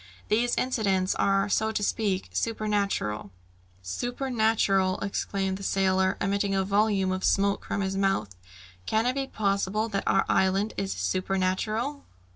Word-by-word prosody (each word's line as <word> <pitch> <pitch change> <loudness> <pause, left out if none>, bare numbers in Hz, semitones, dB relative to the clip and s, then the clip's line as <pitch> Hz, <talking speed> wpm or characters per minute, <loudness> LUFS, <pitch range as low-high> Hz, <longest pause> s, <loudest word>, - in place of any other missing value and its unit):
These 240 +3 +2
incidents 195 -7 +1
are, 195 0 +2
so 220 +2 +1
to 210 -1 -2
speak, 200 -2 -1
supernatural 205 - -1 0.3
" 90 +1 -33 0.2
"Supernatural!" 220 -7 +1
exclaimed 195 -1 -2
the - - -11
sailor, 190 0 +1
emitting 200 0 0
a 190 - +2
volume 200 -1 +2
of 185 0 -3
smoke 200 0 +2
from 200 - -2
his 190 0 -2
mouth. 195 - 0 0.5
"Can 220 +1 +1
it 250 - +2
be 270 0 -2
possible 205 0 0
that 195 -2 -2
our 195 - +3
island 195 +3 +2
is 195 0 -2
supernatural?" 195 +8 -1
195 Hz, 140 wpm, -27 LUFS, 190-220 Hz, 0.5 s, our